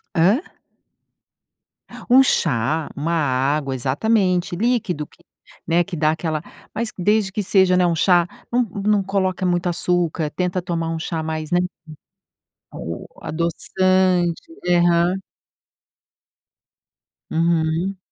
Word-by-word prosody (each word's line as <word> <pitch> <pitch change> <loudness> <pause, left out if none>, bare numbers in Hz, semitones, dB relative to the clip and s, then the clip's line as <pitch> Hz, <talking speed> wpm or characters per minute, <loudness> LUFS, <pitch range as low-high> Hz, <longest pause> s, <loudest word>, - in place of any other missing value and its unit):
Hã? 190 - +4 1.7
Um 255 +2 +8
chá, 150 - 0
uma 155 +4 -2
água, 140 -2 0
exatamente, 180 - +1
líquido 215 -8 0
que, 170 - -24 0.4
né, 170 +1 +3
que 185 0 -7
dá 155 -1 +2
aquela 160 -1 -2 0.3
mas 230 0 -2
desde 205 +1 +1
que 210 +1 -2
seja, 190 -1 +4
né, 180 0 +3
um 170 -1 +1
chá 175 +1 +3 0.2
não 245 +1 +3
não 205 -1 0
coloca 190 -1 -1
muito 175 0 +1
açúcar, 170 -3 0
tenta 180 +2 -1
tomar 165 -2 -2
um 165 0 -3
chá 160 0 -3
mais, 155 0 -4
né. 175 - +3 1.1
O 85 +1 -6 0.2
adoçante, 180 +1 +1 0.3
aham. 175 0 +3 2.2
Uhum. 165 +3 0
175 Hz, 115 wpm, -21 LUFS, 160-190 Hz, 2.2 s, Um